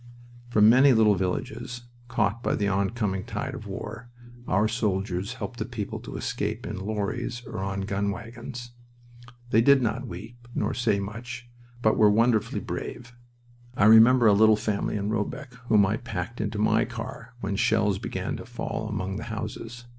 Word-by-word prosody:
From 105 -3 +5
many 130 +4 +7
little 110 -2 +5
villages 120 +6 -3 0.2
caught 115 -1 0
by - - 0
the 100 - 0
oncoming 100 0 0
tide - - -4
of - - -8
war 120 - -7 0.4
our 105 +4 +3
soldiers 100 -2 -1
helped 120 -1 -6
the - - 0
people 115 -4 -5
to - - -8
escape 110 +2 -3
in 105 - -4
lorries 110 +4 -3
or 110 -3 -6
on 95 0 -2
gun 100 +1 -1
wagons. 120 +3 -7 0.8
They 115 - +5
did 140 +3 +6
not 125 +3 -1
weep, 115 +6 -10
nor - - 0
say 110 -5 +1
much, 120 +4 -6 0.4
but 110 - +3
were 105 - +6
wonderfully 115 +1 +2
brave. 120 0 -6 0.6
I 100 - +4
remember 115 +3 +7
a 105 - +7
little 110 +2 +6
family 105 -1 -1
in 100 +1 -2
Robecq 125 +5 -3
whom 105 -3 +5
I 105 +3 0
packed 115 -1 -5
into 105 0 -2
my 105 - +3
car 120 - -7
when 100 0 -2
shells 105 -2 +2
began - - -3
to - - -8
fall - - -4
among 95 +1 -3
the 110 - -6
houses. 115 +2 -6
110 Hz, 170 wpm, -26 LUFS, 100-120 Hz, 0.8 s, many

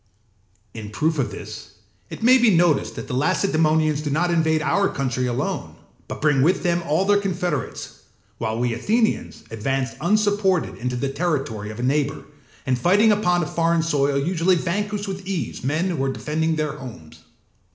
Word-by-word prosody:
In 110 -2 -7
proof 155 +7 0
of 130 - 0
this - - -9 0.4
it - - -8
may 255 +2 +6
be 240 -2 +5
noticed 170 -4 +2
that - - -7
the - - -5
Lacedaemonians 155 0 +2
do 150 - -3
not 170 +5 +1
invade 160 -2 +2
our 195 +7 +2
country 130 -2 -2
alone, 120 0 -3 0.3
but - - -7
bring 145 -3 +3
with 175 +7 +2
them 175 -1 +1
all 160 +6 +2
their 205 0 +4
confederates; 180 - -3 0.4
while 110 0 -2
we 120 -1 0
Athenians 220 - 0
advance 130 +4 -2
unsupported 205 -1 +1
into 125 +1 -2
the 135 +2 -2
territory 135 -10 -2
of 110 +2 -8
a - - -3
neighbour, 140 +2 0 0.4
and 130 -2 0
fighting 205 - +4
upon 180 -4 +2
a - - -1
foreign 165 +1 +1
soil 145 -3 +1
usually 175 +5 +2
vanquish 205 +4 -2
with 190 -1 -6
ease 170 -14 -4
men 155 +8 0
who 145 -6 -2
are 135 - 0
defending 160 +4 -1
their 150 -1 -2
homes. 115 - -11
155 Hz, 170 wpm, -22 LUFS, 135-185 Hz, 0.4 s, may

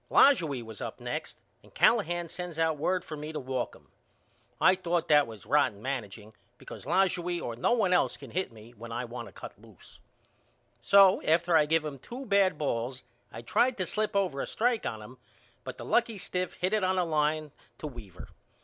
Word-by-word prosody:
Lajoie 160 - +4
was 110 -2 -10
up - - -6
next - - -5 0.2
and - - -21
Callahan 175 +1 +3
sends 175 -1 -7
out 160 -1 +1
word 180 +4 0
for 155 - -6
me 150 +1 -6
to 150 - -3
walk 130 -2 -3
him. - - -19 0.7
I 185 - +6
thought 175 -2 -1
that 145 -3 +5
was 110 -4 -11
rotten 140 -8 +2
manageing 110 -4 -5 0.2
because - - -11
Lajoie 180 -2 +1
or 120 -6 -5
no 125 - +1
one 205 -6 +2
else 180 - +2
can - - -11
hit 185 -7 -2
me 110 +1 -14
when 115 0 -11
I 120 +2 -3
want 120 0 -7
to - - -12
cut - - -11
loose. - - -17 0.8
So 195 +3 +6
after 170 +2 +2
I 150 -2 +5
give 160 0 +2
him 140 -3 -6
two 255 - -8
bad 200 -3 +3
balls 125 -2 -2 0.3
I 115 - -9
tried 245 - +2
to 185 - -1
slip 215 +3 -2
over 180 -9 0
a - - -4
strike 235 0 0
on 110 -1 -5
him 125 +4 -13 0.4
but - - -7
the - - -8
lucky 235 -2 +1
stiff 180 -1 -3
hit 185 +3 -1
it 215 -2 +2
on 185 0 +1
a 180 - +2
line 155 -1 0 0.3
to - - -8
Weaver. 110 - -9
155 Hz, 205 wpm, -29 LUFS, 125-185 Hz, 0.8 s, I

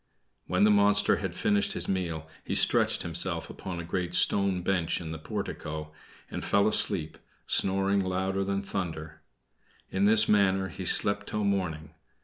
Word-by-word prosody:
When 90 +3 +1
the 105 - +5
monster 105 0 +3
had 90 -1 -5
finished 105 -1 0
his - - -4
meal 85 -5 -3 0.2
he - - -3
stretched - - +2
himself 85 0 -1
upon 90 -2 -7
a - - -5
great 90 +1 -3
stone 95 0 +2
bench 90 -3 0
in 80 -2 -7
the 80 - -6
portico, 75 0 -6 0.4
and - - -5
fell 100 +1 +2
asleep, 95 -7 +2 0.3
snoring 95 +1 +1
louder 95 +1 -2
than 100 0 -2
thunder. 80 -5 -5 0.7
In 95 +1 +1
this 110 +1 +7
manner 95 -2 +2
he - - -7
slept 100 0 +1
till 105 0 -2
morning. 90 -7 -2
95 Hz, 155 wpm, -28 LUFS, 85-100 Hz, 0.7 s, this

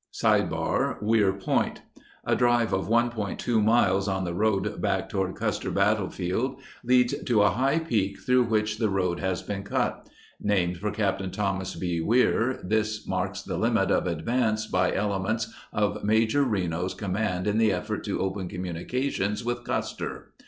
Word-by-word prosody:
O - - +2
Weir 105 -2 +3
Point 95 -1 -1 0.4
A - - +2
drive 120 -3 +2
of 95 -2 0
1.2 115 -1 +1
miles 100 -3 +3
on 95 -1 -1
the 85 -1 -3
road 105 +1 0
back - - 0
toward 95 -1 -1
Custer - - -2
Bat 105 +2 +3
tlefield 95 +6 -2 0.3
leads 125 0 +3
to 110 -4 +4
a 105 - +4
high 135 - +1
peak 105 -12 -1
through 125 -1 +3
which 110 -1 0
the 110 - +2
road 90 -3 0
has 95 -2 -2
been 100 -1 -4
cut. 100 - -2 0.3
Named 90 -4 +1
for 105 +4 -2
Capt. 95 -2 -1
Thomas 95 -2 -2
B. 85 -2 -2
Weir, 120 +4 +2
this 110 +2 -1
marks - - -2
the - - -4
limit - - +2
of - - +2
advance 110 +6 0
by 90 -3 +1
ele 100 -1 0
ments 110 +3 -2 0.2
of 105 0 -1
Major 110 +6 +3
Reno's 90 -6 -1
com 100 -3 -4
mand 95 -3 -1
in 105 +1 +1
the 110 -2 +4
effort 90 -2 -3
to - - -2
open 95 0 -2
communications 95 +5 -2
with 120 0 -2
Custer. - - -4
105 Hz, 165 wpm, -26 LUFS, 95-115 Hz, 0.4 s, to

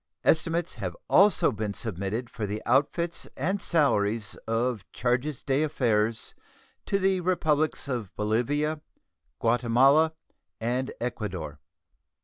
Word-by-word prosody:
Estimates 165 +1 +2
have - - -4
also 200 -1 +5
been 105 -1 -4
submitted 110 +3 -3
for 110 -2 -5
the 105 +2 -4
outfits 150 +7 0
and 190 +8 -1
salaries 110 - +2
of 115 -1 0
charges' 125 +3 -1
d'affaires 125 -7 0 0.5
to 195 - +2
the 190 -1 +2
Republics 155 -5 +1
of 120 -8 -3
Bolivia, 145 +9 0 0.6
Guatemala, 130 +7 +4 0.4
and 125 +3 -1
Ecuador. 90 -11 -4
125 Hz, 105 wpm, -27 LUFS, 110-155 Hz, 0.6 s, also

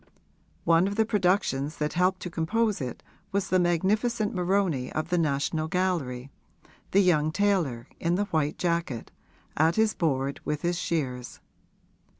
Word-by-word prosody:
One 170 +2 +4
of 200 - -3
the 220 0 +3
productions 180 -8 +1
that 150 0 -1
helped 185 +1 +1
to 180 - -5
compose 210 +4 0
it 125 -2 -5 0.3
was 200 -1 -1
the 185 - +3
magnificent 205 +6 +1
Moroni 180 -8 0
of 155 +1 -3
the 180 - +1
National 155 +1 0
Gallery 160 -8 -1 0.6
the 200 - +4
young 155 -5 +3
tailor, 160 -11 0
in 170 +1 +1
the 205 +3 +1
white 155 -5 -1
jacket, 170 -9 -2 0.4
at 160 +2 +3
his 220 -1 +3
board 140 -4 -1
with 150 -1 -3
his 175 0 0
shears. 130 -9 -3
170 Hz, 150 wpm, -27 LUFS, 150-190 Hz, 0.6 s, One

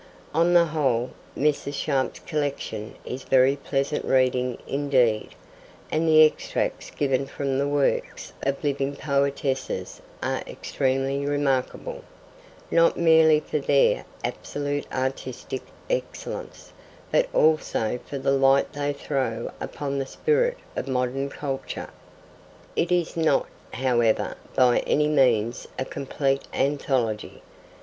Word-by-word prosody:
On 170 +3 +3
the 170 -1 +7
whole, 135 -7 0 0.3
Mrs. 145 -1 0
Sharp's 135 -2 0
collection 145 -8 -3
is 130 +2 -5
very 130 +1 +4
pleasant 140 +1 -1
reading 125 -1 +2
indeed, 130 -6 +2 0.6
and 160 +1 +1
the 155 0 +8
extracts 155 - -2
given 135 -1 0
from 135 -1 -2
the 140 - +1
works 145 -1 -1
of 140 +2 -1
living 140 -1 -1
poetesses 140 -1 -1 0.2
are - - -1
extremely 135 +1 -1
remarkable, 140 -3 -1 0.7
not 165 0 +4
merely 160 -2 +6
for 150 - -2
their 140 0 +3 0.2
absolute 145 0 -3
artistic 130 0 -3 0.3
excellence, - - -5 0.4
but - - +3
also 150 -7 +2
for 140 - -4
the 135 0 +1
light 135 0 +3
they 145 0 -1
throw 135 -5 -2
upon 140 -1 -3
the 135 - -2
spirit 485 - +1 0.2
of - - -3
modern 130 +1 -1
culture. 135 -2 -5 0.8
It 175 - 0
is 175 -2 +1
not, 160 -4 +2 0.3
however, 120 -4 +1 0.2
by 125 -1 +5
any 150 0 +2
means 120 -6 +2
a 130 - -1
complete 135 0 -1
anthology. 130 -6 -1
140 Hz, 115 wpm, -25 LUFS, 130-150 Hz, 0.8 s, the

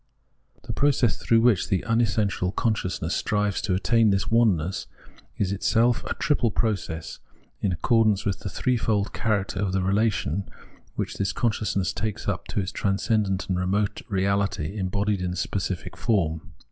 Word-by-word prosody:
The - - -5
process 135 -5 +2
through 115 -1 +2
which 110 -7 +3
the 95 -3 +1
unessential 110 -5 +1
conscious 105 -6 -1
ness 80 - -1
strives 105 -1 0
to 100 -6 0
attain 110 +4 +3
this 95 +1 0
oneness, 100 -7 +2 0.5
is 100 -2 0
itself 115 +4 +2
a - - -3
triple 140 -4 +1
process, 95 -7 -2 0.4
in 100 - 0
accordance 105 +2 +2
with 100 -2 -1
the 100 - -5
threefold 110 -2 0
character 100 -4 -1
of 95 -2 -1
the 95 -1 +1
relation 100 -3 0 0.5
which - - -3
this 100 - 0
consciousness 105 -5 0
takes 110 -2 -3
up - - -2
to - - -2
its 95 0 -2
transcendent 100 -1 0
and 90 -1 0
remote 100 +3 0
reahty 100 -2 0
embodied 100 0 -1
in 90 0 -2
specific 95 -1 -3
form. 85 -9 -1
100 Hz, 150 wpm, -25 LUFS, 95-110 Hz, 0.5 s, which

